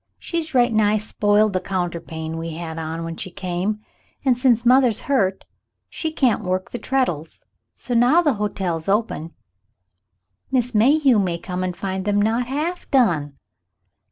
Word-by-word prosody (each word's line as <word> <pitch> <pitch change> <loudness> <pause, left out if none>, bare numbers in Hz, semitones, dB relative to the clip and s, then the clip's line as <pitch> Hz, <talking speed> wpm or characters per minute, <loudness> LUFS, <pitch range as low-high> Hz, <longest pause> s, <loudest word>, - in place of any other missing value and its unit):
She's 325 -4 -4
right 240 -1 +4
nigh 215 -1 +3
spoiled 210 0 +2
the 185 - 0
counterpane 170 -3 -4
we 165 -1 -5
had 165 -1 -6
on 160 +1 -4
when 165 0 -6
she - - -5
came, 185 +4 -3 0.4
and 255 -2 +4
since 245 -2 +2
mother's 250 -3 +4
hurt, 200 -9 0 0.5
she 320 - -3
can't 255 -8 +2
work 185 -1 -2
the 240 - -5
treadles, 210 - -2 0.3
so 250 - -5
now 250 +9 +4
the 295 -4 +3
hotel's 185 -5 -2
open 195 -6 -1 1.2
Miss 250 -2 +1
Mayhew 260 +2 +4
may 180 -4 0
come 180 +1 -4
and 180 -1 -3
find 190 -1 -3
them 205 0 +2
not 225 +4 +1
half 310 +7 -3
done." 160 - +2
210 Hz, 155 wpm, -22 LUFS, 175-250 Hz, 1.2 s, right